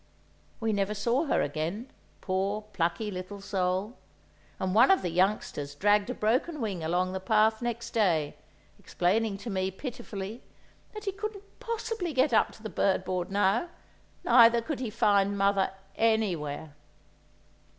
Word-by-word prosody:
We 225 Hz, -1 st, 0 dB
never 200 Hz, +1 st, 0 dB
saw 235 Hz, +9 st, +1 dB
her -, -, +2 dB
again, 165 Hz, -, -3 dB, 0.3 s
poor, 195 Hz, +2 st, -1 dB
plucky 175 Hz, +6 st, -1 dB
little 185 Hz, +2 st, -6 dB
soul; 190 Hz, +3 st, -2 dB, 0.6 s
and 185 Hz, -1 st, -1 dB
one 235 Hz, +5 st, +6 dB
of 385 Hz, -, +4 dB
the 175 Hz, -, -1 dB
youngsters 170 Hz, -6 st, 0 dB
dragged 205 Hz, +6 st, +3 dB
a 250 Hz, -, -3 dB
broken 255 Hz, +9 st, 0 dB
wing 200 Hz, -8 st, -3 dB
along 180 Hz, +3 st, 0 dB
the 190 Hz, -, -2 dB
path 220 Hz, +3 st, +2 dB
next 235 Hz, -1 st, -3 dB
day, 170 Hz, -10 st, +1 dB, 0.4 s
explaining 200 Hz, +3 st, 0 dB
to 225 Hz, +3 st, -6 dB
me, 190 Hz, -1 st, 0 dB
pitifully, 220 Hz, -1 st, -7 dB, 0.5 s
that 425 Hz, 0 st, -7 dB
he 395 Hz, -, 0 dB
couldn't 410 Hz, 0 st, -6 dB, 0.2 s
possibly 450 Hz, -6 st, -3 dB
get 260 Hz, 0 st, +2 dB
up -, -, +4 dB
to 220 Hz, -, -16 dB
the -, -, -3 dB
bird 190 Hz, -1 st, +1 dB
board 180 Hz, -1 st, -2 dB
now, 205 Hz, -, +1 dB, 0.5 s
neither 235 Hz, -1 st, +6 dB
could 270 Hz, +4 st, -4 dB
he 250 Hz, -3 st, -3 dB
find 205 Hz, -2 st, +2 dB
mother 195 Hz, -1 st, +2 dB, 0.3 s
anywhere. 175 Hz, -10 st, 0 dB
205 Hz, 150 wpm, -28 LUFS, 185-235 Hz, 0.6 s, one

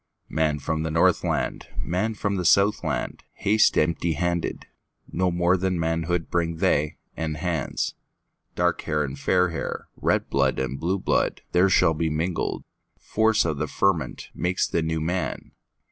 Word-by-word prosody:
Man 80 Hz, -1 st, +1 dB
from 80 Hz, +2 st, -2 dB
the 80 Hz, -, -2 dB
Northland, 80 Hz, +1 st, +1 dB
Man 110 Hz, +6 st, -1 dB
from 100 Hz, -1 st, -1 dB
the 90 Hz, -, -1 dB
Southland, 100 Hz, +4 st, +2 dB
Haste 110 Hz, +2 st, +3 dB
empty 80 Hz, +1 st, +1 dB
handed; 85 Hz, +2 st, -2 dB, 0.5 s
No 90 Hz, +1 st, +1 dB
more 85 Hz, +1 st, +2 dB
than 95 Hz, 0 st, 0 dB
manhoodBring 85 Hz, 0 st, -1 dB
they, 75 Hz, 0 st, +1 dB, 0.2 s
and 80 Hz, -1 st, -3 dB
hands. 80 Hz, -3 st, -2 dB, 0.6 s
Dark 90 Hz, 0 st, +1 dB
hair 75 Hz, -1 st, 0 dB
and 70 Hz, 0 st, -5 dB
fair 90 Hz, +4 st, +2 dB
hair, 85 Hz, -, -5 dB
Red -, -, 0 dB
blood 70 Hz, -1 st, +1 dB
and 65 Hz, +1 st, -2 dB
blue 90 Hz, +4 st, 0 dB
blood, 95 Hz, -, 0 dB
There 90 Hz, +2 st, +4 dB
shall 80 Hz, -3 st, +4 dB
be 80 Hz, +1 st, -1 dB
mingled; 80 Hz, +3 st, -2 dB, 0.3 s
Force 110 Hz, -2 st, +2 dB
of 80 Hz, -4 st, -1 dB
the 75 Hz, -, -1 dB
fermentMakes 90 Hz, +1 st, 0 dB
the 85 Hz, -, +1 dB
New 80 Hz, 0 st, -1 dB
Man. 90 Hz, +4 st, -2 dB
85 Hz, 145 wpm, -25 LUFS, 80-90 Hz, 0.6 s, There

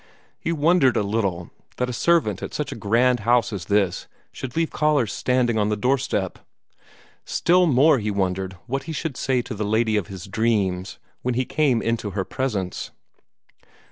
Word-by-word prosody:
He 170 Hz, -, -2 dB
wondered 160 Hz, -4 st, +3 dB
a -, -, +2 dB
little 100 Hz, -5 st, -2 dB, 0.3 s
that 125 Hz, -, 0 dB
a 125 Hz, -, -4 dB
servant 145 Hz, -, +2 dB
at -, -, -6 dB
such -, -, -3 dB
a -, -, -5 dB
grand 120 Hz, +4 st, +2 dB
house 115 Hz, +1 st, +2 dB
as 95 Hz, -5 st, -5 dB
this 100 Hz, -2 st, 0 dB, 0.2 s
should 130 Hz, -1 st, -7 dB
leave 165 Hz, -1 st, +1 dB
callers 145 Hz, -9 st, +1 dB
standing 120 Hz, 0 st, +1 dB
on 105 Hz, 0 st, +1 dB
the 105 Hz, -, 0 dB
doorstep. 130 Hz, +4 st, 0 dB, 0.8 s
Still 180 Hz, +1 st, +3 dB
more 140 Hz, 0 st, +5 dB
he 105 Hz, -1 st, -2 dB
wondered 95 Hz, -1 st, -2 dB
what 135 Hz, +2 st, -3 dB
he -, -, -3 dB
should 155 Hz, -3 st, -3 dB
say 130 Hz, -1 st, 0 dB
to 120 Hz, -, -6 dB
the 105 Hz, 0 st, -3 dB
lady 110 Hz, +1 st, +1 dB
of 95 Hz, -5 st, -2 dB
his 95 Hz, -3 st, -8 dB
dream 100 Hz, -4 st, 0 dB, 0.4 s
when 125 Hz, -1 st, -1 dB
he 130 Hz, +1 st, 0 dB
came 135 Hz, -6 st, +1 dB
into 115 Hz, -2 st, -1 dB
her 95 Hz, -, 0 dB
presence. 105 Hz, -9 st, -3 dB
115 Hz, 175 wpm, -23 LUFS, 100-130 Hz, 0.8 s, more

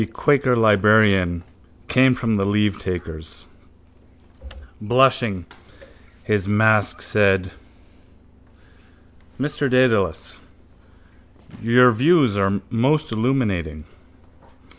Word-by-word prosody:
The 110 Hz, -, -2 dB
quaker 130 Hz, +2 st, 0 dB
librarian 105 Hz, -5 st, +2 dB, 0.4 s
came 130 Hz, 0 st, +3 dB
from 115 Hz, -2 st, -3 dB
the 100 Hz, -2 st, 0 dB
leavetakers. 90 Hz, -6 st, -4 dB, 1.4 s
Blushing, 120 Hz, -5 st, 0 dB, 0.8 s
his 105 Hz, -3 st, -2 dB
mask 105 Hz, 0 st, +1 dB
said: 95 Hz, -3 st, 0 dB, 1.9 s
—Mr 140 Hz, 0 st, -3 dB
Dedalus, 110 Hz, -10 st, 0 dB, 1.2 s
your 125 Hz, +2 st, +4 dB
views 135 Hz, -, +2 dB
are 100 Hz, 0 st, -1 dB
most 135 Hz, +6 st, 0 dB
illuminating. 105 Hz, -, -2 dB
110 Hz, 75 wpm, -20 LUFS, 95-125 Hz, 1.9 s, your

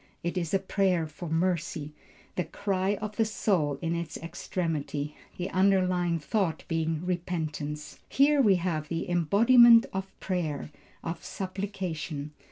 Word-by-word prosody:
It 170 Hz, +2 st, -2 dB
is 170 Hz, -4 st, -2 dB
a 195 Hz, -, +4 dB
prayer 190 Hz, -3 st, +1 dB
for 155 Hz, +2 st, -8 dB
mercy, 160 Hz, -2 st, -1 dB, 0.4 s
the 180 Hz, -, 0 dB
cry 195 Hz, +3 st, -1 dB
of 210 Hz, 0 st, -6 dB
the 225 Hz, -, +4 dB
soul 190 Hz, -9 st, 0 dB
in 165 Hz, 0 st, 0 dB
its 170 Hz, -2 st, -4 dB
extremity; 160 Hz, -3 st, -3 dB, 0.2 s
the 180 Hz, +1 st, -3 dB
underlying 185 Hz, -3 st, +3 dB
thought 165 Hz, 0 st, -1 dB
being 165 Hz, 0 st, -1 dB
repentance. 155 Hz, -4 st, -3 dB
Here 285 Hz, +1 st, +4 dB
we 205 Hz, -6 st, +5 dB
have 170 Hz, -4 st, -1 dB
the 165 Hz, +1 st, -3 dB
embodiment 230 Hz, +7 st, +6 dB
of 190 Hz, 0 st, -2 dB
prayer, 160 Hz, -6 st, -2 dB, 0.3 s
of 165 Hz, 0 st, -5 dB
supplication. 185 Hz, -6 st, -4 dB
175 Hz, 135 wpm, -28 LUFS, 160-195 Hz, 0.4 s, embodiment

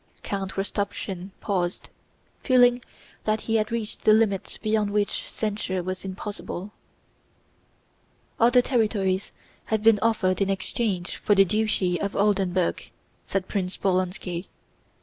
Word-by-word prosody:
Count 195 Hz, -1 st, -3 dB
Rostopchín 195 Hz, -2 st, -3 dB
paused, 180 Hz, -3 st, -2 dB, 0.5 s
feeling 245 Hz, -2 st, +4 dB, 0.4 s
that 215 Hz, 0 st, +1 dB
he 225 Hz, 0 st, +1 dB
had 215 Hz, 0 st, -1 dB
reached 230 Hz, -2 st, -3 dB
the 215 Hz, -, +6 dB
limit 215 Hz, -3 st, +1 dB
beyond 215 Hz, -1 st, +1 dB
which 205 Hz, 0 st, -1 dB
censure 205 Hz, -4 st, -2 dB
was 185 Hz, +1 st, -4 dB
impossible. 195 Hz, 0 st, -6 dB, 1.7 s
"Other 245 Hz, +2 st, +5 dB
territories 205 Hz, -7 st, 0 dB, 0.3 s
have 220 Hz, -1 st, -1 dB
been 220 Hz, -2 st, +6 dB
offered 210 Hz, -4 st, +1 dB
in 195 Hz, -, +2 dB
exchange 195 Hz, -1 st, -1 dB
for 205 Hz, -, +2 dB
the 195 Hz, 0 st, +6 dB
Duchy 200 Hz, -3 st, +1 dB
of 200 Hz, -, -2 dB
Oldenburg," 190 Hz, -3 st, +1 dB, 0.4 s
said 190 Hz, -1 st, -1 dB
Prince 185 Hz, -2 st, -2 dB
Bolkónski. 185 Hz, -1 st, -1 dB
200 Hz, 120 wpm, -25 LUFS, 185-220 Hz, 1.7 s, the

